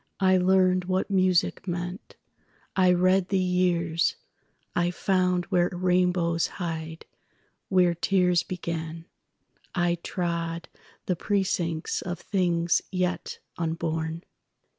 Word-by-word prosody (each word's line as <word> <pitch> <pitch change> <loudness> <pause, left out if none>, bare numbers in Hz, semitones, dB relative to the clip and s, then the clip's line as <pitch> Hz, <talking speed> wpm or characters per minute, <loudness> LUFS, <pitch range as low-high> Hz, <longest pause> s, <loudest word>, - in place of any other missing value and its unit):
I 190 -1 +4
learned 185 0 +3
what 185 +2 -1
music 185 -1 +2
meant; 175 +2 -5 0.6
I 185 -1 +5
read 185 +1 +3
the 195 - +2
years;I 175 -1 -1
found 180 -1 +1
where 180 -1 +3
rainbows 180 -2 +1
hide, 160 -2 -5 0.6
where 180 -2 +4
tears 180 0 +2
begin;I 170 +1 -5
trod 170 -2 -3 0.4
the 180 - 0
precincts 175 -4 -1
of 175 -1 -5
things 175 -3 +1
yet 180 -1 -2 0.2
unborn. 160 0 -2
180 Hz, 95 wpm, -26 LUFS, 170-185 Hz, 0.6 s, I